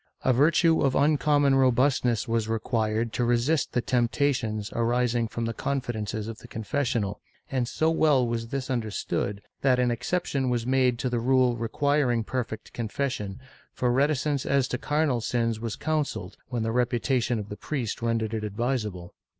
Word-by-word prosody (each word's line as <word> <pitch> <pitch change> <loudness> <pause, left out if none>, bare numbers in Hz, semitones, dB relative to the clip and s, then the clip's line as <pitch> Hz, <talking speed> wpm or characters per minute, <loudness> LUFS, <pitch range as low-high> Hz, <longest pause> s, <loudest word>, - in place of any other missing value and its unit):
A 130 - +3
virtue 160 +5 +4
of 135 -2 +2
uncommon 145 -1 +3
robustness 130 -3 +2
was 115 -1 0
required 110 0 -1
to 125 - 0
resist 120 +6 +1
the 120 - +1
temptations 120 -4 0
arising 120 0 +1
from 115 +1 -3
the 115 - -2
confidences 110 -5 -3
of 115 -1 -7
the - - -13
confessional, 110 -3 -2 0.3
and 130 -3 0
so 160 +6 +1
well 150 -6 +3
was 115 -1 -2
this 135 +1 -3
understood 105 -3 -2 0.2
that 130 -2 +4
an 125 -1 +2
excep 120 +10 -1
tion 135 -2 -1
was 120 -2 0
made 130 -1 +2
to 125 - -1
the 120 - 0
rule 130 0 +3
requiring 125 +1 +1
perfect 115 -2 -4
confession, 115 -3 -3 0.3
for 125 -1 0
reticence 140 +1 +1
as 140 -2 +2
to 125 - -2
carnal 145 -5 +1
sins 115 -1 0
was 115 -1 -4
counselled, 155 -2 -2
when 120 -3 -2
the 115 - -1
reputation 120 0 +1
of 105 -1 -5
the 105 - -5
priest 125 -3 -4
rendered 115 -1 0
it 110 -1 -2
advisable. 105 -4 -3
120 Hz, 165 wpm, -26 LUFS, 115-135 Hz, 0.3 s, virtue